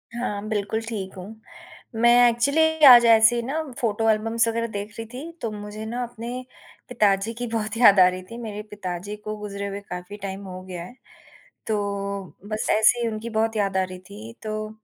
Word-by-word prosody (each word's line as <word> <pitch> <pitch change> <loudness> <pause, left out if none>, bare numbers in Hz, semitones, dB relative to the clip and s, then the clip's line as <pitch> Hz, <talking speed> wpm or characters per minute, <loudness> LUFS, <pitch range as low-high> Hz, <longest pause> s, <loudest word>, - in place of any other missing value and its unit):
हाँ, 210 -4 -3
बिल्कुल 210 +1 -1
ठीक 215 -5 -5
हूँ। 180 - -7 0.8
मैं 240 +1 +7
एक्चुअली 280 +7 +1 0.2
आज 240 -2 +10
ऐसे 225 +1 +6
ही 235 - 0
ना 295 +6 -2 0.2
फ़ोटो 225 -1 +1
एल्बम्स 225 +2 +1
वगैरह 230 0 -1
देख 205 0 -6
रही 225 - -4
थी। 290 +7 -7
तो 230 - -2
मुझे 210 +1 -7
ना 240 +3 -3
अपने 235 -1 -7 0.6
पिताजी 210 -2 +1
की 245 - -3
बहुत 225 -1 -3
याद 205 -5 +7
आ 180 - +8
रही 185 0 -2
थी। 230 - -7
मेरे 210 -2 -5
पिताजी 190 0 -5
को 215 0 -3
गुज़रे 200 -1 -5
हुए 200 0 -5
काफ़ी 180 +3 -7
टाइम 195 0 -5
हो 185 0 -8
गया 180 -2 -7
है। 245 - -12 0.7
तो 220 - +1 0.7
बस 215 0 -2
ऐसे 220 +3 +4
ही 235 - 0
उनकी 220 +1 -5
बहुत 225 0 0
याद 195 -2 0
आ 190 - +3
रही 185 0 -7
थी 220 +3 -10
तो 215 0 -4
215 Hz, 195 wpm, -24 LUFS, 200-230 Hz, 0.8 s, आज